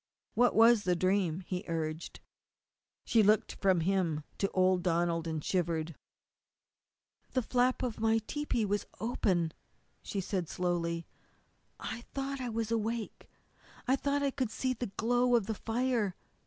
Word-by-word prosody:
"What 245 +1 +3
was 230 0 +7
the 180 -2 +1
dream?" 185 -1 +1
he 180 +1 -4
urged. 160 -1 -4 0.8
She 225 - +4
looked 210 +1 +3
from 190 -4 +4
him 170 -4 +1 0.2
to 195 - +1
old 185 -1 +3
Donald, 170 -1 +1
and 160 -2 -3
shivered. 170 -3 0 1.4
"The 255 - +1
flap 250 +2 +1
of 240 -4 -2
my 225 0 +3
tepee 235 0 -1
was 205 0 -1
open," 185 -7 +1 0.5
she 200 - -4
said 185 -3 -2
slowly. 170 -2 -1 0.7
"I 225 - -5
thought 275 0 -3
I 250 - -2
was 225 0 -2
awake. 225 0 -2 0.6
I 260 - +4
thought 285 +1 0
I 280 - +2
could 260 -4 -1
see 255 +4 -1
the 245 0 -4
glow 245 +2 +3
of 230 -4 +2
the 220 - -2
fire. 225 -3 0
205 Hz, 145 wpm, -32 LUFS, 175-240 Hz, 1.4 s, was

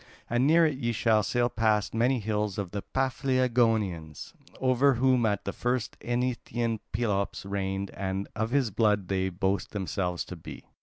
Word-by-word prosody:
And 120 +3 +3
near 165 +2 +6
it 145 -4 -1
ye 120 -3 -1
will 110 -2 +5
sail 120 +4 +1
past 110 -3 +1
many 120 +4 +2
hills 105 -2 -2
of 100 -4 -3
the 100 - -3
Paphlagonians, 115 - 0 0.3
over 130 +1 +3
whom 125 -1 +3
at 100 -2 -1
the 100 - -3
first 125 -1 -1
Eneteian 120 -2 -1
Pelops 105 -4 -1
reigned, 100 0 -2
and 95 0 -3
of 110 +1 -1
his 130 -3 +1
blood 105 -3 +1
they 95 -1 0
boast 95 +1 -1
themselves 95 -3 -2
to 90 - -8
be." 85 - -10
110 Hz, 160 wpm, -28 LUFS, 100-125 Hz, 0.3 s, near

